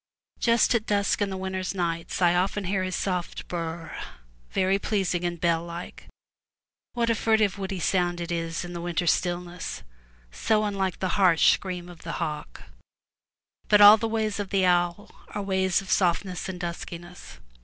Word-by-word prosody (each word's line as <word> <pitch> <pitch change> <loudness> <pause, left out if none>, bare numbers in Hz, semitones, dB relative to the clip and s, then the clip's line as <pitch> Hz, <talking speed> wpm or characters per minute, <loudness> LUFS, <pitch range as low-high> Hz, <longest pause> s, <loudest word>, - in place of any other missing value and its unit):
Just 235 0 +3
at 225 -2 0
dusk 205 0 +1
in 205 - +1
the 190 - -4
winter 190 0 -3 0.2
nights, 170 +1 -2
I 175 -1 +5
often 190 +3 0
hear 190 +1 0
his 185 0 -2
soft 180 -3 -3
bur 175 - -4
r 165 - -2
r 165 -1 -6
r, - - -6 0.5
very 190 +1 +1
pleasing 190 -4 -1
and 175 -1 -2
bell 165 -1 +1
like. 170 +1 -8 0.9
What 235 -1 +1
a - - +4
furtive, 220 -2 +1
woody 190 -1 -3
sound 175 0 +1
it 170 0 -4
is 165 0 -2
in 175 - -8
the 170 - -5
winter 175 0 -1
stillness, 175 +1 -1 0.5
so 215 - +1
unlike 195 -3 -1
the 185 - 0
harsh 175 -4 +6
scream 180 -2 -4
of 175 -2 -12
the 165 - -5
hawk. 150 - -5 1.0
But 210 - +5
all 205 +1 +10
the 225 - -2
ways 220 -2 -1
of 200 -2 -3
the 195 -2 +2
owl 175 +3 +1 0.2
are 205 - -1
ways 190 -2 +1
of 190 - -7
softness 180 0 0
and 180 -1 -6
duskiness. 175 0 -7
185 Hz, 180 wpm, -26 LUFS, 175-200 Hz, 1.0 s, all